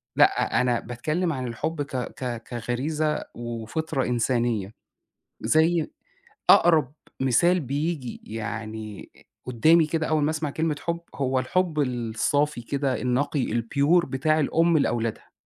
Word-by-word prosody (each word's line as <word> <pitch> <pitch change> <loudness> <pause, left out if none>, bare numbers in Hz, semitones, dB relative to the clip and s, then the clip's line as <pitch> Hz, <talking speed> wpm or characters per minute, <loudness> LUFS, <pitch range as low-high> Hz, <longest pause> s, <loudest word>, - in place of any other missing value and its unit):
لأ، - - +3
أنا 125 -2 +1
باتكلِّم 155 +9 -2
عن 130 -2 -3
الحُب 150 +6 -3
ك 140 -2 -5
ك 125 -2 -4
كغريزة 150 +6 -2
وفطرة 120 +5 -3
إنسانية. 120 -4 0 0.7
زي 160 +1 +2 0.6
أقرب 155 -6 +5 0.3
مثال 170 +8 +3
بييجي 145 -1 -3
يعني 110 -1 -6
آآ - - -20 0.2
قُدّامي 155 +7 +4
كده 160 0 -1
أول 155 -1 +1
ما 155 - +2
أسمع 155 -2 -2
كلمة 155 +1 -1
حُب، 170 0 -2
هو 130 -1 0
الحُب 165 +5 0
الصافي 125 +3 0
كده 135 +2 -1
النقي، 130 +2 0
الpure 140 +9 +2
بتاع 155 +4 +1
الأم 165 +2 +3
لأولادها. 115 -5 -2
140 Hz, 125 wpm, -25 LUFS, 120-155 Hz, 0.7 s, أقرب